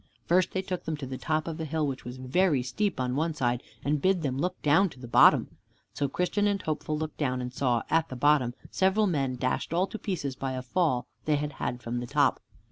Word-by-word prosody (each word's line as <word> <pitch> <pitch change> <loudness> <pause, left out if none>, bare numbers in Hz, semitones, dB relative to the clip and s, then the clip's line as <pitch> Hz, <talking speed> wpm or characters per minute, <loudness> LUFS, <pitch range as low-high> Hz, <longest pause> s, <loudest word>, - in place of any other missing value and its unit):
First 180 +1 +3
they 190 - -1
took 185 -1 -4
them 160 -1 -2
to 145 - -6
the 130 0 -6
top 155 0 -1
of 165 0 -4
a - - -2
hill 155 0 -1
which 135 -2 -4
was 125 +1 -6
very 135 +2 +2
steep 200 +6 -1
on 125 0 -1
one 160 +2 0
side, 120 -4 0 0.2
and 145 0 +1
bid 185 -1 +2
them 135 -3 -1
look 180 +6 -2
down 160 +7 +4
to 130 - -15
the 125 - -8
bottom. 115 - +5 0.4
So 140 - 0
Christian 180 +7 0
and 200 -1 +1
Hopeful 155 -2 -2
looked 155 0 -4
down, 130 -4 0
and 125 0 -5
saw 125 -3 +1
at 165 0 +2
the 130 - -6
bottom 130 -2 +3 0.2
several 190 +3 +3
men 140 -8 0
dashed 130 +5 -1
all 180 +2 +3
to 220 - -7
pieces 150 -10 -3
by 135 0 -3
a 130 0 -4
fall 130 -1 +1
that - - -32
they 150 - +4
had 145 0 -2
had 125 0 -3
from 120 +1 -2
the 120 - -5
top. - - +2
150 Hz, 245 wpm, -28 LUFS, 130-175 Hz, 0.4 s, bottom